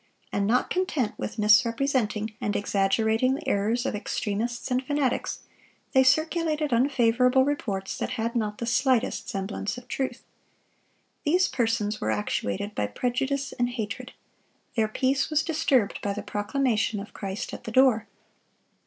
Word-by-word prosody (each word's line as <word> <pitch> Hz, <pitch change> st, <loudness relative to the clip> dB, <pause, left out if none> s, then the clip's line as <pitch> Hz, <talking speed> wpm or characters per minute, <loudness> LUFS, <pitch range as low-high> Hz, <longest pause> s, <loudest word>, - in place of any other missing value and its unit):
And 200 Hz, 0 st, 0 dB
not 245 Hz, +3 st, +2 dB
content 315 Hz, -, 0 dB
with 225 Hz, -, -4 dB
misrepresenting 225 Hz, 0 st, +2 dB
and 210 Hz, -4 st, -1 dB
exaggerating 220 Hz, +5 st, +2 dB
the 320 Hz, +4 st, -8 dB
errors 225 Hz, +5 st, +1 dB
of -, -, -1 dB
extremists 220 Hz, +4 st, -3 dB
and 250 Hz, +1 st, +1 dB
fanatics, 280 Hz, -2 st, -1 dB, 0.5 s
they 265 Hz, -, +5 dB
circulated 310 Hz, +1 st, +2 dB
unfavorable 250 Hz, 0 st, +3 dB
reports 200 Hz, -9 st, -2 dB
that -, -, -2 dB
had 230 Hz, +2 st, -2 dB
not 210 Hz, -3 st, -1 dB
the 235 Hz, -, -3 dB
slightest 255 Hz, 0 st, +1 dB
semblance 200 Hz, +3 st, -3 dB
of 250 Hz, 0 st, -11 dB
truth. 260 Hz, -1 st, -3 dB, 1.0 s
These 360 Hz, +5 st, +3 dB
persons 225 Hz, -4 st, 0 dB
were -, -, -1 dB
actuated 110 Hz, -, -2 dB
by 105 Hz, -, -1 dB
prejudice 265 Hz, -, -1 dB
and 245 Hz, 0 st, 0 dB
hatred. 225 Hz, -4 st, -5 dB, 0.6 s
Their 220 Hz, -3 st, +2 dB
peace 265 Hz, +5 st, 0 dB
was 305 Hz, -1 st, +2 dB
disturbed 270 Hz, -9 st, +1 dB
by 200 Hz, -, -1 dB
the 205 Hz, 0 st, -5 dB
proclamation 215 Hz, +1 st, 0 dB
of 200 Hz, +1 st, -9 dB
Christ 195 Hz, 0 st, -5 dB
at -, -, -8 dB
the 225 Hz, -, -5 dB
door. 250 Hz, -3 st, +4 dB
235 Hz, 145 wpm, -26 LUFS, 210-265 Hz, 1.0 s, they